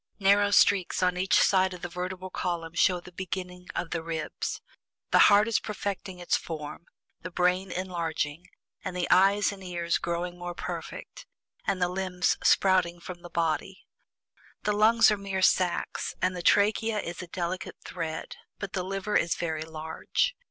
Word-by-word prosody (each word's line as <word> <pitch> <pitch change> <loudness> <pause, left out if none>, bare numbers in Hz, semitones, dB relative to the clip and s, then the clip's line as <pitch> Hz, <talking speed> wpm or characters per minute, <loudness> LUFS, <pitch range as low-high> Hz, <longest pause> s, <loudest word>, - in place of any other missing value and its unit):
Narrow 200 0 +4
streaks 200 -2 +4
on 180 0 +2
each 185 +2 +3
side 190 -1 +3
of 175 - -13
the - - -2
vertebral 185 +1 -5
column 170 -2 -3
show 180 +1 +3
the 180 - -13
beginning 180 0 -6
of 170 - -3
the 165 - -1
ribs. 160 -1 -4 0.5
The - - +5
heart 205 +1 +5
is 230 - +2
perfecting 200 -2 -4
its 175 -1 0
form, 160 +1 -6 0.3
the 185 - -6
brain 180 +1 +1
enlarging, 170 -3 -3 0.4
and 185 -1 -4
the 175 - 0
eyes 200 +3 +5
and 195 -1 -10
ears 170 -2 -1
growing 175 +1 -3
more 175 0 -5
perfect, - - -7 0.4
and 195 -2 +1
the 180 - +2
limbs 180 -1 0
sprouting 185 -3 +3
from 175 0 -9
the 175 - -10
body. 170 +4 -2 0.8
The 210 - +1
lungs 220 +2 +5
are 210 - +1
mere 195 -1 -3
sacks, 180 -1 +1
and 185 0 +1
the 175 - -4
trachea 215 +4 +3
is 170 -1 -5
a 180 - -8
delicate 175 +1 -4
thread, 165 -3 -5 0.2
but 200 -2 -6
the 185 - -1
liver 195 +2 -3
is 170 - +2
very 160 -2 -2
large. 160 - -2
180 Hz, 165 wpm, -28 LUFS, 170-195 Hz, 0.8 s, The